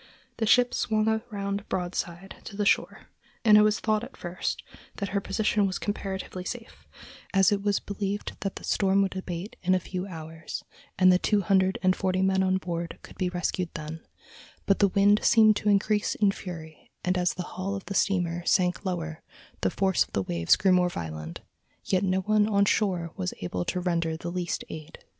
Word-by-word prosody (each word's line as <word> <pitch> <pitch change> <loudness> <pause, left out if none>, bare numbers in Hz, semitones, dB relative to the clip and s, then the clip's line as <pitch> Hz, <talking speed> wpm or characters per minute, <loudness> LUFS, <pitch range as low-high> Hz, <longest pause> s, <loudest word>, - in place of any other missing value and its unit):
The 220 - 0
ship 245 +2 +5
swung 215 -1 +1 0.2
around 200 0 -3
broadside 175 0 -3
to 200 - -8
the 205 - 0
shore, - - +1 0.4
and 215 -2 +8
it 210 - +8
was 210 0 +3
thought 215 0 +1
at 255 - -10
first 175 0 -3 0.3
that 200 -2 -3
her 200 +1 0
position 205 +1 +1
was 190 - -2
comparatively 190 -2 -4
safe, 230 +4 -8 0.5
as 195 0 +5
it 200 -1 +1
was 205 -1 +1
believed 200 0 -4
that 195 - -3
the - - -9
storm 195 0 +2
would 195 -1 -2
abate 185 +1 -5
in 185 +1 +3
a - - +2
few 185 +1 -5
hours, 160 -2 -7 0.3
and 185 -1 +6
the 180 - +3
two 210 +1 +2
hundred 190 0 +2
and 185 0 +4
forty 185 -1 0
men 190 0 +3
on 190 0 +2
board 170 -2 -4
could - - -13
be 185 - +1
rescued 180 0 -2
then; 155 +1 -6 0.6
but 195 - +3
the 200 - +5
wind 200 +2 +4
seemed 220 -2 +6
to 210 - 0
increase 210 +1 +2
in 205 -2 +3
fury, 165 -5 -9 0.2
and 180 +1 +2
as 180 -1 +1
the 180 - -3
hull 190 +2 -3
of 195 - -7
the 200 - -5
steamer 175 -4 +1
sank 180 0 +2
lower 165 -4 -3 0.4
the - - +2
force 190 -2 +2
of - - -19
the 95 - 0
waves 85 -2 +3
grew 190 -1 +2
more 180 -1 +4
violent, 80 - -6 0.4
yet 185 -1 +2
no 190 -1 +1
one 210 +2 +3
on 200 -1 +3
shore 180 -5 +1
was 90 -1 -3
able 90 0 -2
to 180 - -2
render 170 -3 0
the 170 +1 -5
least 175 -1 -2
aid. 155 +1 -9
190 Hz, 200 wpm, -27 LUFS, 175-200 Hz, 0.6 s, and